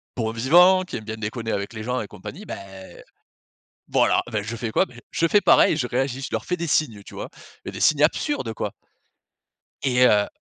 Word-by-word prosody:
bon 110 -2 -1
vivant, 175 +11 +5
qui 180 - -8
aime 110 - -9
bien 110 0 -5
déconner 110 +1 -4
avec 100 +3 -3
les 110 -1 -6
gens 125 +1 -2
et 105 - -6
compagnie, 140 - -10
beh 95 -1 -10 0.9
voilà, - - +3
ben 105 -2 -1
je 115 +3 -5
fais 110 0 -4
quoi? - - +3
Beh 120 -1 -14
je 165 - +1
fais 205 +5 +4
pareil, 155 - +5
je 125 -6 -1
réagis, 130 +2 -2
je - - -4
leur - - -2
fais 180 - -2
des 170 0 -3
signes 120 -10 0
tu - - -13
vois? - - -6 0.4
Des - - -7
signes 150 -1 +3
absurdes 150 - +1
quoi - - -4 1.1
et 130 - 0
heu 105 -2 +3
120 Hz, 205 wpm, -23 LUFS, 110-150 Hz, 1.1 s, vivant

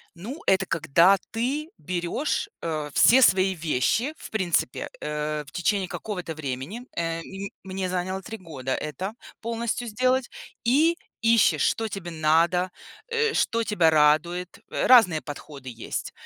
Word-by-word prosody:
Ну, 225 - -7
это 190 0 +4
когда 170 +5 +4
ты 275 +8 -2
берешь, 180 - -2
э, 155 -3 -3
все 260 +3 +6
свои 190 -2 +5
вещи, 170 - 0
в - - -10
принципе, 180 - 0
э, 150 0 -2
в 145 - -15
течение 190 +1 0
какого-то 180 -7 -5
времени- 145 - -5
э, 165 0 -2
м 195 +3 -7
мне 190 -1 -3
заняло 185 +1 -2
3 225 +3 -7
года 140 -8 -5
это 170 +8 -4 0.3
полностью 235 +1 -2
сделать- 255 +3 +1 0.3
и 310 +8 +3 0.2
ищешь, 225 -9 +4
что 225 -1 +1
тебе 185 -4 -6
надо, 165 +3 +2 0.4
э, 455 -1 +1
что 230 0 +1
тебя 180 -7 +3
радует. 155 +4 +2
Э, - - -1
разные 195 -11 +6
подходы 145 -3 -9
есть. 115 -1 -5
185 Hz, 140 wpm, -25 LUFS, 155-225 Hz, 0.4 s, все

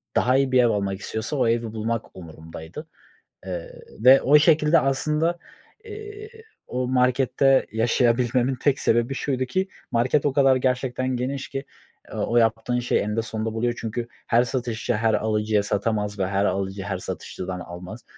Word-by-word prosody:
Daha 130 +2 +3
iyi 135 -1 +1
bir 125 -1 +5
ev 120 - +4
almak 100 -2 -1
istiyorsa 110 +8 -4
o 130 - +2
evi 115 -1 0
bulmak 115 +1 -3
umurumdaydı, 80 - -10 0.6
ııı, - - -5 0.3
ve 130 +2 +8
o 150 +3 +6
şekilde 155 +1 +4
aslında, 155 +5 0 0.5
iii, 425 0 -9 0.4
o 125 0 -2
markette 130 +1 +3
yaşayabilmemin 120 +2 +2
tek 135 +1 +1
sebebi 120 +4 +1
şuydu 130 -2 -1
ki 190 +9 -1 0.2
market 125 +5 +1
o 145 - +2
kadar 135 -1 +4
gerçekten 130 0 -1
geniş 135 +2 -3
ki, 135 0 -5 0.5
ııı, - - -2
o 120 - -1
yaptığın 115 +2 +2
şey 120 - +1
eninde 105 +2 -1
sonunda 110 0 -4
buluyor 120 +1 0
çünkü 115 +1 -4 0.2
her 120 +1 +4
satışçı 120 -1 -2
her 110 0 +1
alıcıya 105 -1 +1
satamaz 105 0 -1
ve 95 - 0
her 100 +1 0
alıcı 95 +1 -2
her 95 -1 -3
satışçıdan 90 0 -6
almaz. 90 +6 -9
120 Hz, 160 wpm, -24 LUFS, 110-135 Hz, 0.6 s, ve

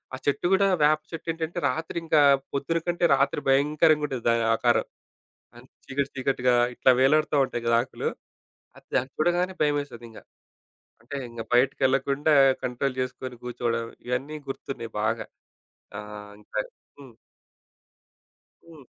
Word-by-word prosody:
ఆ - - -7
చెట్టు 145 - 0
గూడా 195 +1 +4 0.2
వేప 155 +1 +4
చెట్టేంటంటే, 165 +1 -4
రాత్రి 160 +5 -4
ఇంకా 155 -2 +4 0.3
పొద్దున 140 +4 -1
కంటే 175 0 +1
రాత్రి 140 +1 0
భయంకరంగా 150 +3 +3
ఉంటది 130 -4 -5
దాని 115 0 +2
ఆకారం. 120 +1 +2 0.7
అన్ - - -15 0.2
చీకటి 140 +1 -2
చీకటిగా 130 -2 +1 0.2
ఇట్లా 130 - +4
వేలాడుతూ 150 +3 +3
ఉంటాయి 120 -2 -5
గదా! 115 0 +4
ఆకులు 125 - -4 0.9
దాన్ని 130 +2 0
చూడగానే 175 +3 +1
భయమేసేది 145 -5 -1
ఇంగా. 110 - -13 0.8
అంటే 140 - -7
ఇంగ 115 -1 -7
బయటికి 130 +3 +3
ఎళ్ళకుండా 140 +3 +1 0.3
కంట్రోల్ 130 +1 -2
జేసుకొని 130 0 -4
కూర్చోవడం 120 -1 -2 0.2
ఇవన్నీ 135 +5 -3
గుర్తున్నాయి 125 -4 -6
బాగా. 110 +1 -1 0.7
ఆహ్, 105 0 -9
ఇంకా - - -5 0.4
హ్మ్. 130 -5 -14 1.5
హ్మ్. 160 -4 -14
135 Hz, 125 wpm, -26 LUFS, 125-155 Hz, 1.5 s, గూడా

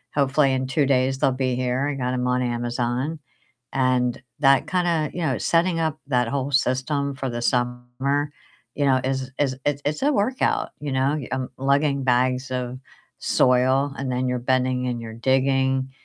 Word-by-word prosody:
hopefully 140 -1 +3
in 130 0 -1
2 140 +1 +1
days 130 0 +2
they'll 135 - +3
be 130 -1 -1
here, 125 +2 0
I 145 - -2
got 125 -1 -2
'em 125 0 -1
on 125 0 +1
Amazon, 120 +4 -2 0.5
and 125 -2 +1 0.2
that 135 -2 +4
kinda, 170 -4 0
you 180 - -4
know, 160 - 0
setting 170 0 +1
up 160 -2 -1
that 125 -4 +1
whole 140 +1 -2
system 140 +1 0
for 135 0 -4
the 120 0 -4
summer, 125 +4 -1 0.4
you 145 - 0
know, 130 -2 +3
is 130 0 -2
is 135 -3 +1
it's 145 -1 0
it's 150 - -2
a 290 +2 +3
workout, 255 +2 0
you 145 -2 -4
know, 135 +3 +1
um, 130 -1 -2
lugging 140 +1 +1
bags 130 +1 +1
of 125 0 -3 0.4
soil, 130 +2 +2
and 135 -1 -3
then 125 +1 0
you're 125 0 0
bending 125 0 0
and 120 -1 -2
you're 115 -1 -8
digging, 130 +2 +1
130 Hz, 175 wpm, -23 LUFS, 125-140 Hz, 0.5 s, that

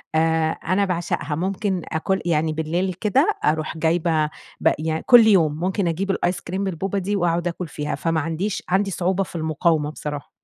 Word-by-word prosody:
آآ 160 0 +2
أنا 185 +5 0
باعشقها 170 -4 -2
ممكن 190 +2 -1
آكل 190 +4 0
يعني 160 -2 +1
بالليل 170 +4 -1
كده 205 +3 +2 0.2
أروح 155 +1 0
جايبة 160 -1 +1 0.4
ب - - +4
يعني 160 0 -2
كلّ 240 -3 +8
يوم 160 -7 +3
ممكن 185 +1 0
أجيب 190 +4 -1
الآيس 180 -1 -1
كريم 190 +3 -3
بالبوبا 195 +1 -2
دي 200 +2 -1
وأقعد 175 -1 +1
آكل 175 0 -4
فيها، 150 -1 -4
فما 165 +2 0
عنديش 165 +6 -2
عندي 195 +2 +1
صعوبة 185 +2 0
في 180 - -11
المقاومة 160 -1 +1
بصراحة. 145 -1 -6
170 Hz, 175 wpm, -22 LUFS, 160-190 Hz, 0.4 s, كلّ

